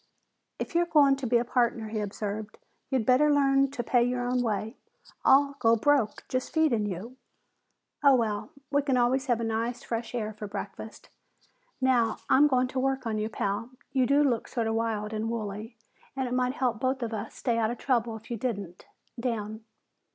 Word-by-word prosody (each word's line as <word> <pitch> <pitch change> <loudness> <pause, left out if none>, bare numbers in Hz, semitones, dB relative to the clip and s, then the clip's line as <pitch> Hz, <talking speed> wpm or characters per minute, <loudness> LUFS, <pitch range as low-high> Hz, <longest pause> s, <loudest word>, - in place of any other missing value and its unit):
"If - - -5
you're 345 0 +2
going 285 -4 +5
to 270 -2 -3
be 240 +1 +4
a 235 - 0
partner," 235 -3 0
he 215 0 -3
observed, 210 +1 -4 0.3
"you'd 260 -5 0
better 265 +5 +4
learn 275 -1 +3
to 260 -3 -4
pay 240 +1 +3
your 245 0 -1
own 250 0 +1
way. 220 0 -2 0.5
I'll 280 +1 +5
go 230 0 +4
broke 245 -2 +1
just 255 0 -2
feeding 260 -10 +2
you. 205 +7 -6 0.9
Oh, 280 -2 +7
well, 215 -3 -1 0.2
we 285 0 +3
can 275 -3 +1
always 260 +3 +2
have 240 -2 +2
nice 230 +2 -2
fresh 230 +1 -4
air 215 -2 -2
for 210 0 -7
breakfast. 205 +2 -8 0.7
Now 245 -4 +2
I'm 290 +3 +7
going 255 -2 +2
to 260 - -2
work 265 0 0
on 220 -2 -1
you, 215 +1 -2
Pal. 205 +2 -2 0.2
You 260 -2 +2
do 285 +2 +4
look 245 -6 0
sort 235 -3 -2
of 225 - 0
wild 220 -2 -1
and 220 +1 -2
woolly 220 0 -5 0.4
and 265 -1 -1
it 245 - -3
might 250 0 +1
help 245 -5 -1
both 260 -1 0
of 230 -1 -3
us 210 - -5
stay 235 -3 0
out 220 -1 +1
of 240 - -4
trouble 235 -4 0
if 220 +2 -11
you 235 - -2
didn't. 200 -7 -4 0.3
Down!" 220 -3 -3
240 Hz, 195 wpm, -28 LUFS, 220-260 Hz, 0.9 s, Oh